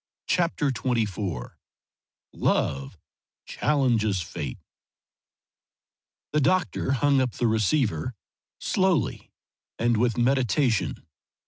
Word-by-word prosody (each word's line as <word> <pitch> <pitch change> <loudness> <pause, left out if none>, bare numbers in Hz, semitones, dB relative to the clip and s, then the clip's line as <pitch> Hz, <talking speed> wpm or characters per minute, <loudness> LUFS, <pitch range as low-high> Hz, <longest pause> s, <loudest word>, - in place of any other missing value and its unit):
CHAPTER 165 -5 +1
XXIV 105 - -2 0.8
LOVE 70 0 0 0.5
CHALLENGES 115 - +1
FATE 70 -5 -5 1.8
The 150 - +3
doctor 180 -4 +1
hung 140 0 +3
up 125 -2 -1
the 120 - -1
receiver 110 - +1 0.4
slowly 185 - 0 0.5
and 120 0 +2
with 120 +1 +1
meditation. 125 - +1
120 Hz, 80 wpm, -26 LUFS, 105-140 Hz, 1.8 s, The